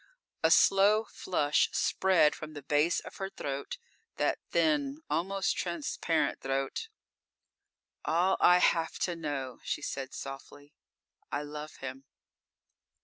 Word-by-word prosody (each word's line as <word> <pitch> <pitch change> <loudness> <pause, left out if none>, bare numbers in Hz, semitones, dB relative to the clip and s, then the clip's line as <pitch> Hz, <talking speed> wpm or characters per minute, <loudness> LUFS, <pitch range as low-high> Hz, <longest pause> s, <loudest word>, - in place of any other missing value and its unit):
A - - +4
slow 205 +3 +5
flush 150 -8 +1
spread 185 -5 +3
from 155 0 -8
the 145 -2 -8
base 150 +4 +2
of - - -11
her 195 0 -3
throat, 140 - -5 0.4
that - - 0
thin, 295 -1 +1
almost 190 +5 0
transparent 165 -1 -1
throat. 135 - -2 1.1
"All 180 +3 +2
I 180 - +7
have 165 -2 +2
to 175 - -1
know," 140 -6 -4
she - - -3
said 135 -1 -4
softly. 145 +1 -9 0.6
"I 145 - -1
love 150 +1 -7
him." 130 +1 -7
155 Hz, 120 wpm, -30 LUFS, 145-190 Hz, 1.1 s, I